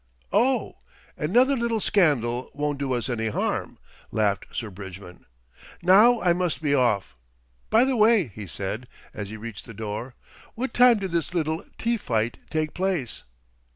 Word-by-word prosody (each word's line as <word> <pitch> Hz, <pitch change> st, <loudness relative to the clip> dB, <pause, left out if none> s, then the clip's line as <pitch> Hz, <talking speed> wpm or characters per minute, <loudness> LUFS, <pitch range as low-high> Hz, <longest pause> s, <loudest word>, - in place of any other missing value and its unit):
"Oh! 250 Hz, +5 st, +2 dB, 0.4 s
another 245 Hz, -, +3 dB
little 235 Hz, -2 st, 0 dB
scandal 130 Hz, -, +2 dB
won't 145 Hz, -1 st, -2 dB
do 140 Hz, -2 st, -2 dB
us 120 Hz, 0 st, -1 dB
any 115 Hz, -3 st, -1 dB
harm," 110 Hz, -, -2 dB, 0.3 s
laughed 105 Hz, -2 st, 0 dB
Sir 110 Hz, -3 st, -4 dB
Bridgman. 95 Hz, -1 st, -10 dB, 0.6 s
"Now 215 Hz, +7 st, +6 dB
I 175 Hz, -2 st, +4 dB
must 180 Hz, -1 st, -1 dB
be 150 Hz, -3 st, 0 dB
off. 120 Hz, -, +1 dB, 0.5 s
By 230 Hz, +3 st, +5 dB
the 265 Hz, -1 st, +1 dB
way," 215 Hz, -, +4 dB
he 105 Hz, -1 st, -8 dB
said, 100 Hz, +7 st, -4 dB, 0.3 s
as 105 Hz, -2 st, -6 dB
he 110 Hz, -, -7 dB
reached 110 Hz, -1 st, -8 dB
the 115 Hz, -, -11 dB
door, 110 Hz, +4 st, -5 dB, 0.4 s
"what 245 Hz, +1 st, -3 dB
time 245 Hz, -2 st, +6 dB
did 190 Hz, -3 st, -4 dB
this 170 Hz, +1 st, -1 dB
little 160 Hz, -1 st, -1 dB
tea 235 Hz, +1 st, 0 dB
fight 115 Hz, -, -1 dB
take 155 Hz, -1 st, -1 dB
place?" 180 Hz, -9 st, -2 dB
150 Hz, 155 wpm, -25 LUFS, -, 0.6 s, Now